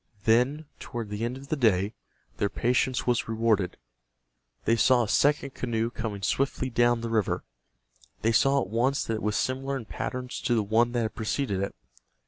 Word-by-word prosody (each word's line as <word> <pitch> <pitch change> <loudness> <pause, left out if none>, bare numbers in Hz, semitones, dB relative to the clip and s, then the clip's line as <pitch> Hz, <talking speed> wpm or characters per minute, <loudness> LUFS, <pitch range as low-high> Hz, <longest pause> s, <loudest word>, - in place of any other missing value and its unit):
Then, 125 +8 +3
toward 115 -3 -6
the 105 +2 -3
end 120 +2 -2
of 140 +1 -12
the - - +1
day, 105 -6 +2 0.4
their 100 - +1
patience 125 +2 +1
was 120 -2 +1
rewarded. 110 -5 +1 0.9
They 115 - +4
saw 125 +1 +4
a - - -3
second 140 +4 +2
canoe 115 -1 -1
coming 105 -4 -5
swiftly 130 +3 0
down 120 0 +3
the 115 - -3
river. 110 -3 0 0.8
They 115 - +3
saw 135 +4 +4
at 95 - -5
once 125 +6 +1
that 115 - -2
it 110 - -3
was 105 0 0
similar 135 +1 -1
in 120 - -7
pattern 125 +3 -4
to 120 - -1
the 110 - +2
one 115 +4 +2
that 120 -1 +1
had 110 - -3
preceded 110 -3 -1
it. 100 - -3
115 Hz, 185 wpm, -27 LUFS, 110-130 Hz, 0.9 s, They